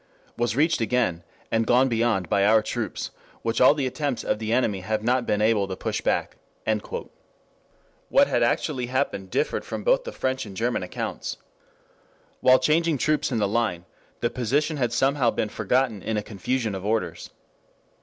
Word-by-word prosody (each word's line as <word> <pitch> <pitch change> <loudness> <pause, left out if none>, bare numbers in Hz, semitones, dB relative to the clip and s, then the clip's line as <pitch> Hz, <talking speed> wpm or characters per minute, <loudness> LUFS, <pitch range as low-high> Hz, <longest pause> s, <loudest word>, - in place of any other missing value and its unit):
] - - -33
was 120 -2 0
reached 155 0 +2
again 115 -8 0 0.3
and 115 0 +1
gone 125 +2 +5
beyond 115 -6 +1
by 100 +2 +2
our 110 +1 +5
troops, 110 -3 -4 0.3
which 115 +1 0
all 130 +3 +7
the 140 -3 -1
attempts 135 0 -2
of - - -1
the 110 0 -3
enemy 115 -5 +1
have 110 +3 -2
not 125 +1 +1
been 105 0 +1
able 110 -3 +3
to 95 - -4
push - - -3
back."] - - -1 1.7
What - - +5
had - - 0
actually 125 -1 0
happened 125 -7 -2
differed - - -1
from - - -5
both - - +3
the - - -6
French 130 0 -2
and 95 -2 -10
German 120 -2 0
accounts. 90 - -4 1.0
While 130 0 +6
changing 155 +3 +2
troops 150 +1 +1
in 120 - 0
the 105 -2 +2
line, 100 -5 -1 0.4
the 120 - 0
position 145 +6 0
had 120 -4 0
somehow 135 +1 +2
been 110 - -1
forgotten 110 0 0
in 110 +4 -2
a 105 - -1
confusion 110 +3 -2
of 95 -1 -5
orders. 110 +2 -2
120 Hz, 175 wpm, -25 LUFS, 105-130 Hz, 1.7 s, all